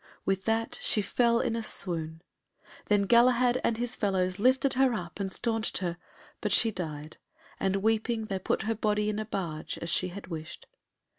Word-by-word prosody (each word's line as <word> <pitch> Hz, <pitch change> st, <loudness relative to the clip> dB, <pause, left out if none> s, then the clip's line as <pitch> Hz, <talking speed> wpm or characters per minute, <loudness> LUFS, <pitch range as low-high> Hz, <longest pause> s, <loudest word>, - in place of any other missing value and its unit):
With 195 Hz, 0 st, 0 dB
that 225 Hz, 0 st, 0 dB
she 210 Hz, -, +3 dB
fell 235 Hz, +3 st, +2 dB
in 225 Hz, -, 0 dB
a 230 Hz, -, -1 dB
swoon. 165 Hz, -6 st, -3 dB, 0.6 s
Then 205 Hz, -1 st, +3 dB
Galahad 245 Hz, +3 st, +4 dB
and 225 Hz, -, +1 dB
his 245 Hz, +1 st, -3 dB
fellows 190 Hz, -2 st, 0 dB
lifted 260 Hz, +4 st, +3 dB
her 260 Hz, -2 st, +3 dB
up 175 Hz, -1 st, -6 dB
and 195 Hz, -1 st, -1 dB
stanched 225 Hz, +1 st, 0 dB
her, 175 Hz, -2 st, -2 dB, 0.5 s
but -, -, -1 dB
she 225 Hz, -, +4 dB
died, 155 Hz, -5 st, -6 dB, 0.4 s
and 195 Hz, 0 st, 0 dB
weeping, 220 Hz, +1 st, +1 dB
they 195 Hz, -3 st, -3 dB
put 185 Hz, -, -1 dB
her 225 Hz, +2 st, 0 dB
body 210 Hz, -1 st, 0 dB
in 210 Hz, 0 st, -2 dB
a 215 Hz, -, -3 dB
barge 165 Hz, -7 st, -4 dB
as 170 Hz, -, -2 dB
she 185 Hz, -, +1 dB
had 195 Hz, +3 st, -8 dB
wished. 160 Hz, -2 st, -8 dB
210 Hz, 180 wpm, -29 LUFS, 185-230 Hz, 0.6 s, Galahad